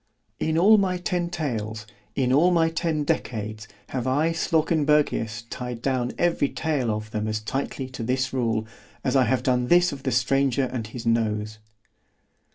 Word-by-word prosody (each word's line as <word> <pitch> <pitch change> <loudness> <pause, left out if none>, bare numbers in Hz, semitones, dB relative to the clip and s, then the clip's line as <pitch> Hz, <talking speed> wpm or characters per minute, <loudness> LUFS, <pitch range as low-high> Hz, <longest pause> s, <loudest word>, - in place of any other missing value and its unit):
In 160 0 0
all 210 +5 +6
my 185 -2 +1
ten 175 -1 -1
tales, 110 -10 -3 0.3
in 130 -1 +1
all 160 +6 +5
my 165 -2 +3
ten 160 -2 -1
decades, 110 -5 -3 0.2
have 130 -1 -3
I 150 +5 +2
Slawkenbergius 150 -8 +1
tied 125 -2 -5
down 130 -2 0
every 170 -5 +2
tale 150 -7 -1
of 110 0 -3
them 110 -1 -2
as 110 0 -1
tightly 130 +4 -3
to 130 -2 -7
this 130 +3 -1
rule, 115 -4 0 0.4
as 130 - 0
I 130 -2 +5
have 125 +3 +1
done 125 -1 +1
this 175 +3 +5
of 140 - -7
the 130 - -1
stranger 135 +2 +2
and 125 -4 -3
his 115 +2 -8
nose. 110 -2 0
130 Hz, 165 wpm, -25 LUFS, 115-155 Hz, 0.4 s, all